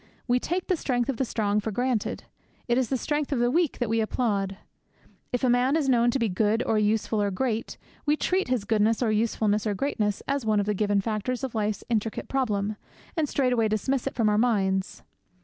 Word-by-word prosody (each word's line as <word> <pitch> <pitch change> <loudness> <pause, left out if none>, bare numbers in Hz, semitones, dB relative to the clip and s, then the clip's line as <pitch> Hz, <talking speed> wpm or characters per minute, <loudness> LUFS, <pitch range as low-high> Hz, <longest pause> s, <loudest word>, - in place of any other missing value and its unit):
We 245 0 +3
take 355 +7 -2
the 370 - +1
strength 250 -5 -1
of 265 - -1
the 265 - 0
strong 210 -3 0
for 210 - -3
granted; 245 +1 -1 0.4
it 240 - +2
is 255 - 0
the 265 - +1
strength 295 +3 -2
of 275 - +1
the 240 +1 +2
weak 335 0 +1
that 245 - -1
we 225 +1 +1
applaud. 200 -4 -1 0.7
If 245 - -2
a - - +4
man 250 +3 +3
is 310 -4 +1
known 240 -2 +4
to 240 - +1
be 230 -3 +1
good 215 +4 +1
or 220 - +2
useful 215 0 +1
or 205 - +1
great, 225 +3 -2 0.3
we 300 +1 +2
treat 375 +4 0
his 250 -5 0
goodness 220 +2 +2
or 225 - +2
usefulness 215 -1 +1
or 205 - 0
greatness 210 -4 -1
as 280 -1 0
one 215 -1 +2
of 200 - 0
the 210 - 0
given 205 0 +1
factors 230 +5 -2
of 265 - -3
life's 215 -2 -1
intricate 225 -2 -2
problem, 215 -6 -1 0.4
and 310 -4 0
straightway 250 -5 +2
dismiss 245 +5 -1
it - - -4
from 225 -3 +2
our 210 0 +3
minds. 195 -5 0
230 Hz, 220 wpm, -26 LUFS, 210-255 Hz, 0.7 s, a